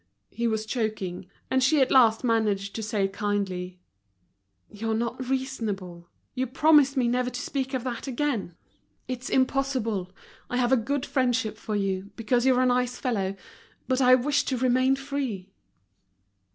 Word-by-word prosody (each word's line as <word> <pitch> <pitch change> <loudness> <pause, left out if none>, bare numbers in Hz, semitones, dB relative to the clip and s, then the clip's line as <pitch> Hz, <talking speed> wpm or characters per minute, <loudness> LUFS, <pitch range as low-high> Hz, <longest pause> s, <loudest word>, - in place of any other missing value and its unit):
He 235 +2 -1
was 220 -1 -1
choking, 215 -6 -3 0.2
and 260 0 +3
she 295 +3 +4
at 265 - +3
last 230 -4 +5
managed 210 -4 +1
to 225 - -4
say 210 -2 0
kindly: 195 -3 -3 0.9
"You're 220 +1 -3
not 235 +3 -3
reasonable; 205 -10 -3 0.2
you 260 0 -1
promised 280 +1 +4
me 250 -2 +3
never 250 +1 +1
to 250 - -6
speak 265 -1 -3
of 255 - -2
that 250 0 -4
again. 245 - -2 0.5
It's 255 0 -5
impossible. 255 -8 0 0.4
I 245 - -1
have 245 0 +1
a - - +7
good 265 +3 -1
friendship 245 -5 0
for 215 0 -4
you, 195 -1 -2
because 240 +2 +1
you're 255 -1 +4
a - - +3
nice 250 0 +1
fellow; 195 -6 -1 0.5
but 260 0 +1
I 255 0 +7
wish 280 +3 +1
to 260 - -1
remain 255 +2 +3
free." 265 -9 -4
245 Hz, 155 wpm, -26 LUFS, 210-260 Hz, 0.9 s, a